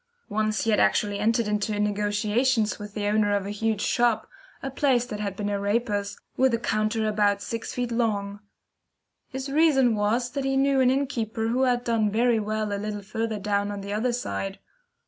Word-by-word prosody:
Once 215 +1 0
he 225 - +1
had 210 - +3
actually 205 -1 +2
entered 225 +1 +1
into 210 0 -1
negotiations 210 +3 +1
with 205 0 -9
the 210 -1 -2
owner 205 0 +2
of 200 -1 -1
a 200 - -4
huge 215 0 -1
shop, 235 -2 +1 0.4
a 270 - -3
place 265 -3 +2
that 210 -4 -6
had 200 -2 -3
been 205 +1 -3
a 205 -1 -1
raper's, 205 -1 -1 0.2
with 260 -2 +3
a - - 0
counter 215 0 0
about 205 -1 +2
sixty 230 +3 -4
feet 240 - -4
long. 205 -4 -1 0.9
His 265 +1 -5
reason 275 -5 +4
was 225 +4 0
that 275 +1 -3
he 270 0 0
knew 275 0 +3
an 255 -1 +5
innkeeper 230 -5 -1
who 250 +3 +1
had 245 -1 +1
done 225 -3 +1
very 230 +2 +2
well 215 0 -2
a 200 - -3
little 210 -1 -4
further 220 +2 -3
down 205 0 -1
on 205 -1 -5
the 200 +1 -5
other 230 +4 0
side. 195 -5 -3
215 Hz, 195 wpm, -26 LUFS, 205-240 Hz, 0.9 s, an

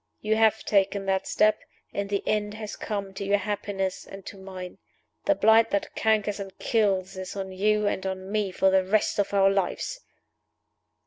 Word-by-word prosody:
You 215 +1 +1
have 220 -1 +3
taken 200 -1 +1
that 190 0 0
step 215 0 +3 0.3
and 200 0 -2
the 200 -1 -1
end 210 0 0
has 215 -1 -6
come 200 -3 -4
to 195 - -5
your 200 +1 +3
happiness 200 -2 -3
and 195 -1 -10
to - - -8
mine. 190 -2 -9 0.5
The 300 - +4
blight 220 -1 +5
that 200 - -2
cankers 215 -2 +1
and 195 -1 -7
kills 195 -4 +1
is 185 +1 -6
on 190 -1 -4
you 210 +3 +1
and 205 - -1
on 190 0 -5
me 210 -2 0
for 190 +1 +3
the 190 0 +4
rest 205 +2 +1
of 200 - +1
our 195 -1 +4
lives!" 195 - -1
200 Hz, 185 wpm, -26 LUFS, 190-210 Hz, 0.5 s, blight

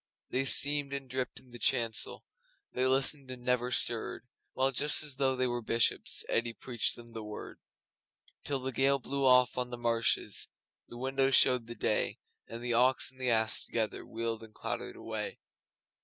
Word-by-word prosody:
They 135 +1 0
steamed 145 +1 +3
and 135 -1 -5
dripped 130 0 -3
in 125 -1 -20
the 120 - -10
chancel, 115 -2 +1 0.5
They 130 +1 +1
listened 135 +1 +2
and 125 -1 -8
never 125 0 +1
stirred, 120 +1 -2 0.3
While, 135 +1 +2
just 145 +4 +2
as 145 -3 -4
though 135 -1 +2
they 130 0 +1
were 120 -1 -1
Bishops, 115 +1 +2
Eddi 115 0 0
preached 120 -1 -1
them 120 -1 -13
The 110 -1 -6
Word. 105 0 -8 0.8
Till 140 - -1
the 130 +1 -4
gale 135 +2 +3
blew 135 +1 -1
off 125 0 +5
on 125 -1 -2
the 120 - -6
marshes 115 -1 +1 0.4
And - - -13
the - - -8
windows 135 0 +2
showed 125 -3 +5
the 120 - -7
day, - - 0 0.3
And 115 +1 -8
the 120 -1 -1
Ox 125 +3 +3
and 130 0 -16
the 125 - 0
Ass 110 -1 +2
together 110 -3 -2
Wheeled 115 0 -4
and 110 -1 -13
clattered - - -4
away. - - -5
125 Hz, 185 wpm, -31 LUFS, 115-135 Hz, 0.8 s, off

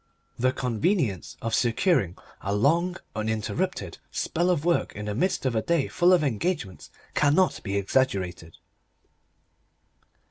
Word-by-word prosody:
The 130 +1 +3
convenience 125 - -1
of 115 0 -2
securing 115 - +2 0.2
a 100 +1 -1
long, 170 - +2 0.2
uninterrupted 110 - -2
spell 175 +2 0
of 170 -4 +1
work 175 -1 +1
in 105 - -5
the 105 - -2
midst 180 - 0
of 125 -3 +1
a 110 - +2
day 170 -1 +1
full 175 +1 +3
of 180 -4 +5
engagements 130 - -2 0.2
cannot 150 +6 +3
be 100 -1 -2
exaggerated. 95 -7 -1
130 Hz, 130 wpm, -26 LUFS, 105-170 Hz, 0.2 s, of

